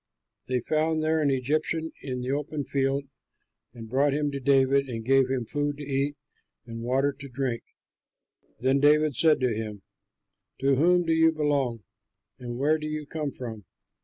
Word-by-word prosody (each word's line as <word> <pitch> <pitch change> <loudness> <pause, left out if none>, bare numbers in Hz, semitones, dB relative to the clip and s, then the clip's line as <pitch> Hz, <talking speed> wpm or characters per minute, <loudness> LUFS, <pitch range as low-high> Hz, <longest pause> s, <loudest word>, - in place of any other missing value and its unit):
They 125 -1 0
found 155 +4 0
there 160 0 +2
an 145 - +2
Egyptian 155 +5 -1
in 125 -2 -4
the 125 +1 -2
open 145 +1 -2
field 135 +1 0 0.7
and 115 -2 -10
brought 135 +4 +2
him 145 -1 0
to 140 - -4
David 135 0 +3
and 115 -2 -5
gave 135 0 +4
him 130 -3 -1
food 145 +3 -2
to 145 - -7
eat 140 +1 -1 0.5
and 115 -1 -7
water 135 +4 +1
to 140 0 -10
drink. 125 -2 -2 1.0
Then 130 +3 +2
David 150 +1 +4
said 155 +4 +4
to 125 -3 +2
him, 105 -3 -5 0.8
"To 135 0 +3
whom 175 +6 +3
do 165 - +2
you 160 0 +5
belong, 140 -7 0 0.6
and 120 -1 -6
where 150 +4 +2
do 155 - -4
you 155 0 -4
come 150 0 -3
from?" 115 -5 -7
140 Hz, 170 wpm, -27 LUFS, 125-150 Hz, 1.0 s, you